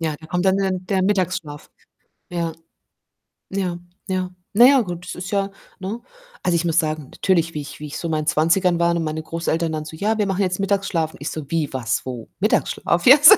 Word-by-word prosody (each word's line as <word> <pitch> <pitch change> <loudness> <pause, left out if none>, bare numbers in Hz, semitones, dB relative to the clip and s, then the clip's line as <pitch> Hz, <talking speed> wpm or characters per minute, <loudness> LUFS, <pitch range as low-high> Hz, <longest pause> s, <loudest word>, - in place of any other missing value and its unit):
Ja, 160 -2 -1
da 160 - -11
kommt 180 +2 -1
dann 190 0 +4
dann 185 -1 -1
der 190 -1 +1
Mittagsschlaf. 185 -6 -1 0.6
Ja, 170 -2 -2 1.0
ja, 185 -3 -1 0.3
ja. 185 -1 -1 0.2
Na 235 +4 +8
ja, 270 0 +7
gut, 175 -4 -5
das - - -6
ist 180 0 -6
ja 200 -1 +1 0.3
ne? 200 +5 -4 0.4
Also, 180 - +2
ich 170 +1 +1
muss 170 0 +3
sagen, 155 -2 -1
natürlich, 170 -4 +1
wie 150 - -3
ich 145 - -9
wie 150 - -6
ich 145 - -6
so 170 - -3
in - - -2
meinen 155 -1 -1
20ern 170 +3 +3
war 170 0 +3
und 170 - 0
meine 155 0 -2
Großeltern 165 0 -1
dann 155 -1 -3
so: 160 - -8
„Ja, 215 +5 +1
wir 210 - +2
machen 195 0 0
jetzt 185 -1 0
Mittagsschlaf.“ 195 -5 0
Und - - -15
ich 145 - -2
so: 150 -3 -6
„Wie? 160 -3 0
Was? 125 -3 -1
Wo? 125 -3 -6
Mittagsschlaf, 170 0 +1
jetzt?“ 295 +10 +10
175 Hz, 220 wpm, -22 LUFS, 160-195 Hz, 1.0 s, jetzt